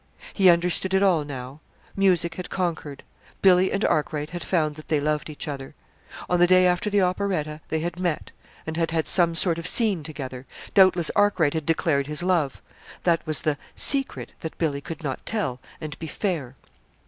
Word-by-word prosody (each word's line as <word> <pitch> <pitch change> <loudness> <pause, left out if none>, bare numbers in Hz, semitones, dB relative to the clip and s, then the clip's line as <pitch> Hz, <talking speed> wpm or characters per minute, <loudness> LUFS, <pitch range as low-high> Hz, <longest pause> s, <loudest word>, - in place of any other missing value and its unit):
He 190 -3 +5
understood 180 +2 +3
it 190 - +3
all 175 -6 +3
now. 135 0 -8 0.4
Music 180 -4 +2
had 180 +1 -7
conquered. 165 -6 -3 0.4
Billy 185 -1 +5
and 200 - 0
Arkwright 150 0 -1
had 175 0 -5
found 155 -5 0
that 155 +1 -12
they 155 -2 +1
loved 150 +1 -1
each 155 +1 -7
other. 135 -2 -6 0.5
On 180 - +1
the 175 - +6
day 185 0 +5
after 180 +3 +1
the 205 -1 +2
operetta, 180 -5 -1
they 160 0 -1
had 175 +1 -4
met, 175 -4 -2 0.3
and 160 0 -5
had 165 -1 0
had 160 -1 -1
some 170 -2 +3
sort 170 -1 +1
of 170 - -5
scene 210 -8 +2
together 135 -4 -7 0.3
doubtless 185 -4 +4
Arkwright 200 -8 +3
had 160 -2 -3
declared 155 -4 +1
his 150 +3 +1
love. 170 -7 0 0.4
That 170 -2 +2
was 155 - 0
the 150 -2 -1 0.2
"secret" 275 -1 +1
that 160 - -7
Billy 145 -4 -1
could 160 +2 -8
not 135 -3 -4
tell 170 - -2 0.2
and 155 -2 -7
be 160 - -6
"fair." 155 - -3
165 Hz, 185 wpm, -24 LUFS, 150-185 Hz, 0.5 s, the